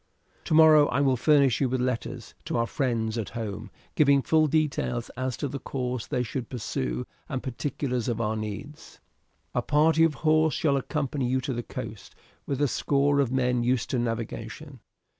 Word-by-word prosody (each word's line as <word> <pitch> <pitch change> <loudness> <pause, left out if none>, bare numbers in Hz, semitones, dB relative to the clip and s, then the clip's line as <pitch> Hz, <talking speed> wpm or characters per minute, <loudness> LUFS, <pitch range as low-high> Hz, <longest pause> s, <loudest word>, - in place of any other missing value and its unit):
Tomorrow 155 -2 +6
I - - 0
will 135 -2 +3
furnish 140 0 +3
you 135 - +2
with 130 +1 -1
letters 125 -1 -3
to - - -2
our 115 - +2
friends 115 -3 -1
at 110 - -4
home, 105 -1 -5 0.2
giving 140 -3 +4
full 155 -1 +3
details 145 -6 -1
as 130 -1 -3
to 145 - -2
the 140 +1 -5
course 125 -2 -4
they 125 - -1
should 120 0 -5
pursue 65 - -3 0.2
and 130 - -3
particulars 130 -1 -3
of 120 -2 -1
our 110 -1 0
needs. 110 +8 -7 0.5
"A - - +1
party 160 +2 +3
of 160 -2 +3
horse 155 0 +4
shall 145 -3 +2
accompany 140 -1 -2
you 130 +1 +1
to 130 - -3
the 120 - -2
coast, - - -8 0.3
with 140 -2 -2
a - - +4
score 140 +2 +1
of 135 -4 +1
men 125 -2 +1
used 125 0 0
to 125 - +1
navigation. 120 +4 -5
130 Hz, 180 wpm, -27 LUFS, 120-145 Hz, 0.5 s, Tomorrow